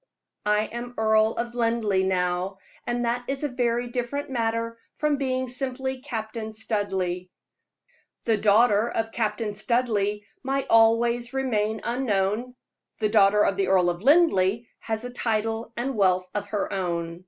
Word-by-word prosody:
I 210 0 +3
am 240 +2 -6
Earl 220 0 +3
of 235 0 -3
Linleigh, 230 -5 +1
now, 180 +1 0 0.3
and 240 0 0
that 240 +1 -1
is 275 +1 -3
a - - +2
very 245 -1 0
different 260 +4 -3
matter 230 -1 -1 0.2
from 300 -1 +1
being 260 -1 -1
simply 265 +1 -3
Captain 220 -4 -5
Studleigh. 195 -5 -2 1.0
The 225 - +2
daughter 215 +1 +4
of 225 -1 -2
Captain 220 -1 -1
Studleigh 210 -2 0 0.2
might 270 +1 -1
always 235 +2 +4
remain 220 -5 0
unknown; 235 -1 -1 0.4
the 215 -2 +1
daughter 210 -1 +5
of 195 - +1
the 195 -1 +1
Earl 180 -2 +4
of 175 +1 -7
Linleigh 235 - +4 0.2
has 220 +1 -3
a 245 - -5
title 225 -1 -1
and 260 +2 -2
wealth 185 -3 +2
of 205 -1 -3
her 205 0 -2
own. 170 -3 -2
225 Hz, 145 wpm, -25 LUFS, 205-245 Hz, 1.0 s, daughter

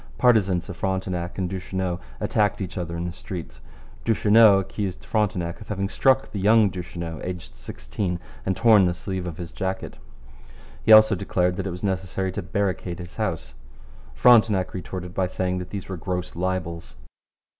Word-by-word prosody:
Partisans 100 -8 +3
of 100 - -7
Frontenac 95 -2 -2
and 95 -2 -1
Duchesneau 95 -1 -3 0.2
attacked 105 -2 +1
each 95 -3 -5
other 85 -3 -4
in 85 - -3
the 90 - -3
streets. 90 -1 -8 0.4
Duchesneau 110 -2 +6
accused 95 -1 -4
Frontenac 95 -6 -1
of 105 - -10
having 100 -2 -2
struck 135 +4 +2
the 100 - -4
young 105 +1 +5
Duchesneau, 85 -3 -6
aged 90 -1 -6
sixteen, 85 - -4 0.2
and 95 - -1
torn 110 -5 +6
the 90 -1 0
sleeve 95 0 -4
of 85 -2 -6
his 85 -2 -7
jacket. 95 0 -4 0.9
He - - +3
also 110 0 +9
declared 90 -2 0
that 95 0 -2
it - - -3
was 90 +3 -8
necessary 95 -1 -1
to 100 - -4
barricade 95 -2 -2
his 90 0 -10
house. - - -3 0.6
Frontenac 105 - +5
retorted 90 -1 -6
by 95 -1 0
saying 90 0 -2
that 90 - -7
these 100 -2 -6
were 95 - -5
gross 90 +2 -4
libels. 85 -2 -3
95 Hz, 165 wpm, -24 LUFS, 90-100 Hz, 0.9 s, also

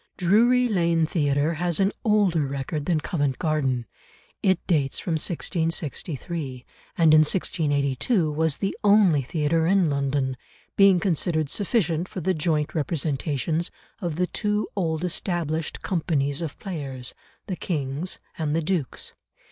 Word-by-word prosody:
Drury 235 +7 +4
Lane 170 -6 +2
Theatre 145 -1 +1
has 170 0 -1
an 195 +1 +3
older 195 - +3
record 140 +2 -4
than 165 -4 +2
Covent 145 -6 -1
Garden. 135 -7 0 0.6
It 190 -2 +3
dates 145 -7 +1
from 175 - -3
1663, 160 -4 -3 0.3
and 160 -2 +5
in 155 - +8
1682 155 - +1
was 160 -1 +1
the 195 - -2
only 200 -8 +5
theatre 160 +4 0
in 185 -4 +3
London, 140 -2 0 0.4
being 195 -2 +6
considered 160 -4 0
sufficient 180 -4 0
for - - -5
the 185 +2 +1
joint 155 -2 0
representations 155 +1 -1 0.3
of 175 -6 -3
the 180 +2 +1
two 210 +2 -1
old 165 -4 -1
established 170 -3 -2
companies 150 -5 0
of 160 -4 -5
players, 135 -9 -5 0.3
The 190 - -3
King's 150 0 -2 0.2
and 155 -1 0
The 165 - 0
Duke's. 160 -6 -2
160 Hz, 130 wpm, -25 LUFS, 145-180 Hz, 0.6 s, in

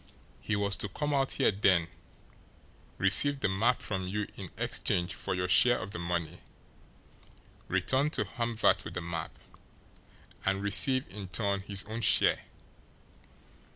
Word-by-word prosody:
He 110 - -2
was 100 -1 -1
to 105 - -4
come 150 +8 -3
out 135 -1 +1
here - - +2
then, 95 -4 +2 1.1
receive 145 -1 +4
the - - +1
map 110 +6 +1
from 95 -3 -3
you 105 +2 -2
in - - -8
exchange 90 +3 0
for 100 - -3
your 90 0 -1
share 120 +6 +5
of 95 +2 -7
the 85 - -6
money, 85 -1 -3 1.3
return 130 +11 +1
to - - 0
Hamvert 115 -2 0
with - - -8
the - - -3
map, 85 -2 -6 1.1
and 95 +1 0
receive 130 +6 +3
in 95 +1 -8
turn 100 +1 -1
his 100 0 -1
own 110 +2 -6
share. 100 - +3
100 Hz, 145 wpm, -30 LUFS, 95-115 Hz, 1.3 s, share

